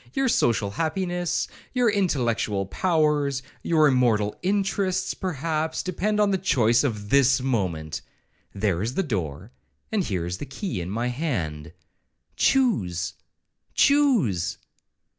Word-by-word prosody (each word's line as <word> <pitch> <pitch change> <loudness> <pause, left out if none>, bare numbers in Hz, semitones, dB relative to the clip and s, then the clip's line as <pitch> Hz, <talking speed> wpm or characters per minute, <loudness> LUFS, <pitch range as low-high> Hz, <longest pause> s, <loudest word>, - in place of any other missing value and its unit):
Your 270 -1 +2
social 105 - +2
happiness, 175 - -1 0.3
your 250 -1 +3
intellectual 120 - 0
powers, 150 - +1 0.2
your 155 -2 +4
immortal 115 -6 +2
interests, 190 -1 0
perhaps, 160 -2 -2
depend 205 +4 -1
on 205 -1 +3
the 190 - +1
choice 120 - +3
of 105 -6 -3
this 135 -1 +5
moment.—There 95 -3 -3
is 115 +5 -2
the 195 - +1
door, 95 - -4 0.4
and 215 -2 +1
the 90 - -3
key 135 - -4
is 85 - -5
my 115 +6 -2
hand. 85 - -3 0.6
Choose—choose!' 90 - +1
130 Hz, 105 wpm, -25 LUFS, -, 0.6 s, this